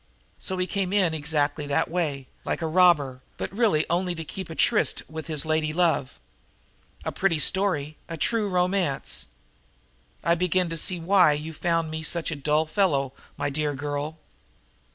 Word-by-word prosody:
So 190 - -5
he 185 - 0
came 190 -1 -2
in 185 -5 +3
exactly 150 -1 -1
that 140 - +1
way, 155 -6 -2 0.2
like - - -2
a - - +1
robber, 160 -6 +3 0.2
but - - -4
really 210 -9 +3
only 180 +1 0
to 165 - -5
keep 190 +4 -7
a 165 - -6
tryst - - +2
with 160 0 -7
his 155 -2 -1
lady 155 -1 0
love? 165 -6 +1 0.9
A - - -1
pretty 190 -4 +1
story, 155 -4 +1
a 165 - -5
true 215 +5 +1
romance! 180 -5 0 1.0
I 170 - +3
begin 180 +1 +1
to 165 - -3
see 180 +2 +1
why 180 -2 +5
you 155 +2 -5
find 165 0 0
me 160 0 -4
such 165 +1 -2
a - - -2
dull 150 +2 +1
fellow, 155 -7 +1 0.2
my 145 - -1
dear 150 0 -1
girl." 145 +3 -4
160 Hz, 170 wpm, -26 LUFS, 150-180 Hz, 1.0 s, why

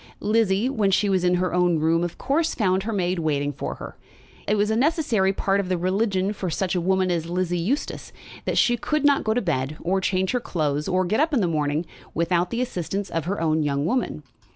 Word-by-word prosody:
Lizzie, 215 0 +2
when 220 -7 +1
she 200 +1 +2
was 190 -2 +1
in 180 0 +3
her 180 0 0
own 180 -2 +3
room, 165 +2 +2
of 175 - -4
course 310 +5 0
found 190 -4 +1
her 220 +4 -3
maid 185 -3 0
waiting 145 -3 0
for - - -5
her. - - -9 0.5
It 210 - +2
was 210 +1 +1
necessarily 240 - +2
part 195 0 0
of 190 -2 -2
the 185 - +1
religion 190 +2 0
of 190 -5 -3
such 190 -2 -1
a 180 - 0
woman 190 +1 +1
as 165 -1 -2
Lizzie 175 0 -1
Eustace 235 - -2 0.3
that - - -1
she 240 -1 +4
could 305 +4 -1
not 285 -1 +4
go 220 0 0
to 245 - +1
bed, 150 -3 -1
or 190 +2 0
change 185 0 0
her 250 - +1
clothes, 150 -8 -2
or 185 0 +1
get 215 +7 0
up 310 0 +2
in - - +3
the 180 - +2
morning, 150 0 0 0.3
without 170 +1 +1
the 235 - -2
assistance 195 -3 -4
of 165 -2 -2
her 200 +3 -2
own 160 -1 +1
young 140 -1 0
woman. 190 -6 -1
185 Hz, 225 wpm, -24 LUFS, 170-215 Hz, 0.5 s, she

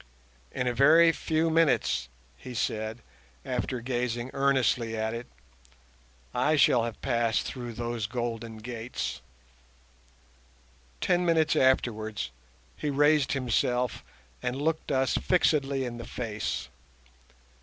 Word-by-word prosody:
"In 125 - -2
a 125 - +1
very 160 +6 +6
few 160 0 0
minutes," 165 -2 +2 0.3
he 125 - -9
said, 110 +1 -2 0.4
after 125 -1 -2
gazing 120 0 -2
earnestly 130 -4 +1
at 110 +1 -1
it, 115 +1 -6 1.1
"I 145 +5 +2
shall 125 -5 +4
have 115 -2 -6
passed 115 -2 +1
through 120 -3 -6
those 120 -1 -3
golden 115 -1 -4
gates." 110 - -5 1.8
Ten 180 0 +2
minutes 160 -3 +3
afterwards 110 -6 +1 0.4
he 150 - -3
raised 145 0 +3
himself 125 -2 0 0.4
and 125 +2 -2
looked 160 +1 -1
us 130 -1 +2
fixedly 140 -6 +2
in 120 -1 -5
the 120 - -7
face. 110 - -4
125 Hz, 110 wpm, -28 LUFS, 115-140 Hz, 1.8 s, very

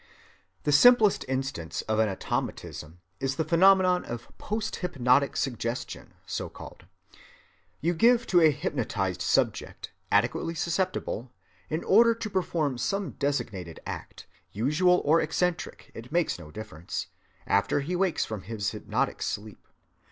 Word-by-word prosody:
The 145 - +1
simplest 220 - +6
instance 130 - -3
of 110 0 -1
an 110 -1 +3
automatism 90 -3 -4 0.2
is 135 0 -1
the 160 - 0
phenomenon 180 +2 +5
of 120 0 -8
post‐hypnotic 145 - 0
suggestion, 120 -2 -3
so‐called. - - -7 1.0
You 170 +3 +1
give 235 +6 +4
to 175 -2 +4
a 160 - +7
hypnotized 100 -10 -2
subject, - - 0 0.2
adequately 165 - +1
susceptible, 170 - -2 0.4
an 155 +2 -2
order 230 +3 +5
to 230 -1 -5
perform 160 -8 -1
some 195 - -1
designated 100 - -3
act—usual 155 - -1
or 160 +3 +4
eccentric, 165 +2 -2
it 115 +2 -10
makes 170 +1 +1
no 75 - -11
difference—after 100 - -3
he 170 +6 -3
wakes 180 -2 +1
from 110 -3 -5
his 105 +1 -3
hypnotic - - -2
sleep. 105 0 -5
145 Hz, 120 wpm, -27 LUFS, 110-180 Hz, 1.0 s, a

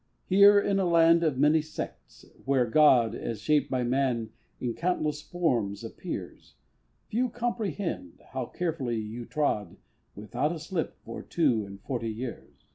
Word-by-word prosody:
Here 200 +2 +7
in 200 -1 +1
a 190 - +2
land 165 0 +5
of 150 -5 +1
many 150 +3 +4
sects, 155 +1 -8 0.2
where 135 -2 +2
God 120 -3 +5
As 115 -3 -4
shaped 145 +4 +2
by 130 -1 0
man 120 -3 0 0.3
in 120 -2 -2
countless 155 -3 -1
forms 120 - -1
appears, - - -7 0.5
Few 245 +3 0
comprehend 220 - -3
how 130 -2 -3
carefully 155 -9 -2
you 110 +2 -5
trod 145 -9 -1 0.4
Without 120 +9 -2
a - - -5
slip 165 +1 -3
for - - -6
two 125 -11 +1
and 100 0 -10
forty 120 -4 -3
years. 115 +2 -7
145 Hz, 145 wpm, -28 LUFS, 120-170 Hz, 0.5 s, Here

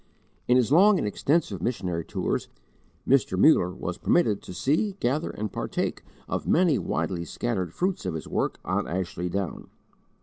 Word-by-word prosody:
In 125 - +5
his 125 0 +2
long 195 +6 +6
and 105 - -1
extensive 125 - 0
missionary 90 -6 -2
tours, - - -2 0.6
Mr. 125 -8 +3
Muller 95 - +5
was 90 -1 -5
permitted 110 - +2
to - - -10
see, 150 - 0
gather, 150 -3 -1
and 105 -1 -5
partake - - -2 0.3
of - - -3
many 170 -5 +3
widely 90 -3 -2
scattered 95 -3 -3
fruits 185 - -1
of 85 - -2
his 80 - -6
work - - -1
on - - -1
Ashley 90 0 -3
Down. 95 -1 -4
110 Hz, 160 wpm, -26 LUFS, -, 0.6 s, long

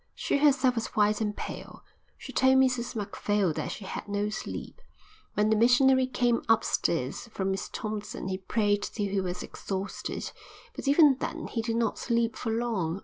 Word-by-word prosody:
She - - 0
herself 270 -3 +4
was 230 -2 -2
white 210 0 +3
and 210 -1 -1
pale. - - -7 0.3
She - - -9
told 265 0 +5
Mrs 255 -2 +2
Macphail 205 -3 0
that - - -3
she 200 - -7
had - - -6
no 205 +1 -1
sleep. 215 - -6 0.5
When 210 +1 +2
the - - +5
missionary 255 +3 +5
came 245 -2 +1
upstairs 170 - +1
from 195 -4 -2
Miss 190 - -3
Thompson 215 -3 -5
he 190 0 -2
prayed 205 +1 +1
till 205 -2 -3
he 195 -1 +1
was 180 -1 -4
exhausted, 195 0 -5 0.4
but - - -6
even 285 -2 +6
then 325 0 -4
he 230 - -2
did 225 0 -2
not 230 0 0
sleep 235 -1 0
for 235 - -4
long. 215 -7 -1
220 Hz, 175 wpm, -28 LUFS, 205-245 Hz, 0.5 s, even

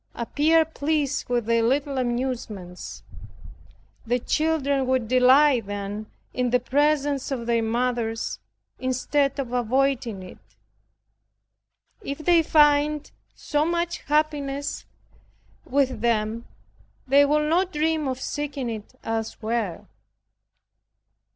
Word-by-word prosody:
Appear 310 +7 +2
pleased 295 -3 -1
with 240 -2 0
their 230 0 +2
little 270 +3 0
amusements. 215 - -4 1.0
The 240 +2 +1
children 280 0 0
will 260 -2 +1
delight 255 0 +4
then 205 +1 -5 0.3
in 250 -1 0
the 250 +1 +3
presence 285 +1 +1
of 250 -4 -3
their 235 -1 +1
mothers, 230 0 -1 0.4
instead 270 +2 0
of 255 -3 -4
avoiding 245 -4 0
it. 185 - -12 1.6
If 280 -8 -5
they 335 +2 +4
find 295 -1 +3 0.2
so 295 0 0
much 340 +1 -1
happiness 290 -2 -1 0.8
with 265 -1 0
them, 225 0 0 0.6
they 280 +2 +6
will 300 +1 +2
not 360 +4 +2
dream 310 -1 0
of 260 -1 -3
seeking 280 -3 -3
it 220 +2 -8
elsewhere. 225 -3 -3
260 Hz, 105 wpm, -24 LUFS, 235-295 Hz, 1.6 s, they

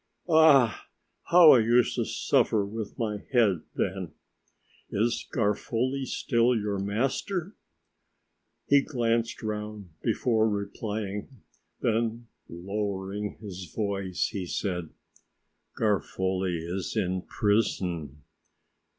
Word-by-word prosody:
Ah! 150 -8 +5 0.4
how 170 -2 +8
I 125 - +7
used 120 +2 +3
to - - -1
suffer 105 -2 +1
with 105 +1 -6
my 105 -3 -1
head 105 - +3
then." 95 -3 -2 0.8
"Is 115 +3 0
Garofoli 120 +4 0
still 120 +1 +2
your 105 -2 -2
master?" 135 - -2 1.1
He 140 0 +5
glanced 115 -5 -1
round 105 -3 -5
before 110 -1 +2
replying, 105 +2 -4 0.4
then 115 +1 0 0.2
lowering 100 +2 -4
his 95 -5 -8
voice 100 -4 -1
he 95 -5 -5
said: 90 -4 -3 0.9
"Garofoli 95 -4 0
is 90 +6 -4
in 95 -3 0
prison. 90 -9 -1
105 Hz, 95 wpm, -27 LUFS, 95-115 Hz, 1.1 s, how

